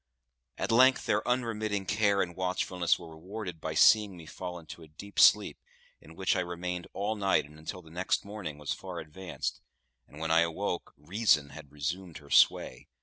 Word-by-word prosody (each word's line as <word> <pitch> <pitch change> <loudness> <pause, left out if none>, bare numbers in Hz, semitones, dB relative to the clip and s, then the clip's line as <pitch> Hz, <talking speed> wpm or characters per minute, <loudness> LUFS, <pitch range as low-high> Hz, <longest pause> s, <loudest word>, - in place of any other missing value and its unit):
At - - -2
length 130 +3 +5
their 105 - +2
unremitting 110 -5 -1
care 100 0 +2
and 85 -1 -7
watchfulness 90 -1 0
were 80 - -11
rewarded 90 0 -7
by 80 0 -4
seeing 105 +2 +5
me 85 - -11
fall 90 +2 -6
into 80 0 -11
a 80 - -12
deep 100 +7 -7
sleep, - - +5 0.4
in 80 - -15
which 95 +2 +1
I - - +1
remained 90 0 -4
all 105 +3 -1
night 100 -7 +2
and 75 +1 -15
until 90 +3 -7
the 80 - -16
next 90 +4 -1
morning 100 -8 -6
was 75 -1 -3
far - - -8
advanced; 90 +4 -5 0.5
and 75 - -15
when 80 0 -2
I 80 - +6
awoke, 85 +2 -2
reason 80 -1 +2
had 70 0 -12
resumed 80 +4 -4
her 70 -1 -15
sway. - - +3
90 Hz, 185 wpm, -30 LUFS, 80-100 Hz, 0.5 s, I